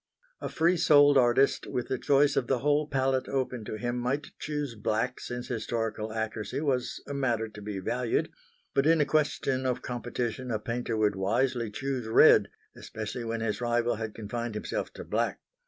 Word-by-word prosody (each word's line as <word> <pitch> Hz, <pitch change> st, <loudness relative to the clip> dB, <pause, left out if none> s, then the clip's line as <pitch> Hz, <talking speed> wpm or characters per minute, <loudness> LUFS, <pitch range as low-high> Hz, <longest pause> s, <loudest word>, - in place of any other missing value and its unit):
A -, -, -4 dB
free 170 Hz, +3 st, +2 dB
souled 145 Hz, -3 st, +6 dB
artist 130 Hz, +1 st, +3 dB
with 125 Hz, -, -3 dB
the 130 Hz, -, -2 dB
choice 145 Hz, 0 st, +3 dB
of 125 Hz, -, +1 dB
the 135 Hz, -, +2 dB
whole 145 Hz, +3 st, +1 dB
palette 135 Hz, -2 st, 0 dB
open 130 Hz, -3 st, -2 dB
to 110 Hz, -, -5 dB
him 120 Hz, +2 st, -2 dB
might 135 Hz, +4 st, -2 dB
choose 150 Hz, -4 st, -3 dB
black 110 Hz, +3 st, -1 dB
since 125 Hz, 0 st, -5 dB
historical 110 Hz, -2 st, -3 dB
accuracy 110 Hz, 0 st, -3 dB
was 135 Hz, -5 st, -1 dB
a 140 Hz, -, -4 dB
matter 120 Hz, -5 st, 0 dB
to 105 Hz, -1 st, -11 dB
be 105 Hz, -1 st, -5 dB
valued; 120 Hz, +5 st, -1 dB, 0.4 s
but 140 Hz, +2 st, +2 dB
in 165 Hz, 0 st, +5 dB
a 150 Hz, -, +4 dB
question 140 Hz, -3 st, 0 dB
of 130 Hz, -2 st, -1 dB
competition 120 Hz, 0 st, -3 dB
a 110 Hz, -, 0 dB
painter 115 Hz, +1 st, -3 dB
would 105 Hz, -2 st, +2 dB
wisely 115 Hz, +4 st, 0 dB
choose 125 Hz, +2 st, -3 dB
red 110 Hz, -, +6 dB, 0.3 s
especially 110 Hz, +3 st, -6 dB
when 115 Hz, 0 st, -2 dB
his 110 Hz, +1 st, -2 dB
rival 120 Hz, -1 st, +1 dB
had 110 Hz, -1 st, -5 dB
confined 115 Hz, +1 st, -4 dB
himself 105 Hz, -, -3 dB
to -, -, -8 dB
black. -, -, -1 dB
120 Hz, 180 wpm, -29 LUFS, 110-135 Hz, 0.4 s, souled